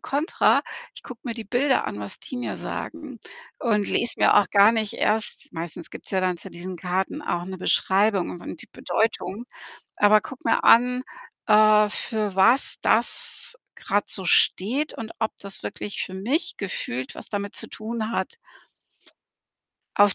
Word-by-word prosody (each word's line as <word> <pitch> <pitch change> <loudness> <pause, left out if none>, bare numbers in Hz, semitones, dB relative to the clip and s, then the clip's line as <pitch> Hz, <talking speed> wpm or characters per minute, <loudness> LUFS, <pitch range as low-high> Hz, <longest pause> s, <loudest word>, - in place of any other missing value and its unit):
Kontra. 295 +6 +2 0.3
Ich - - -11
gucke 245 -3 -10
mir 235 -3 -3
die 225 -2 -7
Bilder 260 +5 +1
an, 105 - -5
was 100 - -5
die 255 - -7
mir 245 - -4
sagen 300 -6 -6 0.4
und 210 -4 +1
lese 235 - 0
mir - - +5
auch 205 -2 +5
gar 205 +2 +6
nicht 220 -2 -1
erst 215 +1 -1
meistens 165 0 -6
gibt's - - -11
ja 190 - +1
dann 185 -1 0
zu - - -8
diesen 180 +1 -7
Karten 185 - -2
auch 175 -10 -2
'ne 190 0 -7
Beschreibung 195 +1 +2
und 175 - -8
und - - -8
die - - -15
Bedeutung 220 -1 -2 0.5
aber 210 +1 +5
gucke 260 - -7
mir - - +2
an, 250 +2 +5 0.4
äh, 215 0 +6
für 210 -2 -3
was 230 +8 +4
das - - +2 0.2
grad 205 +1 -1
so 190 - -3
steht 245 - +2
und 225 -1 -7
ob 220 -1 -1
das 200 -1 -5
wirklich 205 - -5
für 185 - -6
mich 270 - -1
gefühlt 130 - -4
was - - -8
damit 200 -1 -4
zu - - -4
tun 220 0 -4
hat. 470 - -3 1.6
Auf 205 -1 +5
210 Hz, 165 wpm, -24 LUFS, 190-235 Hz, 1.6 s, gar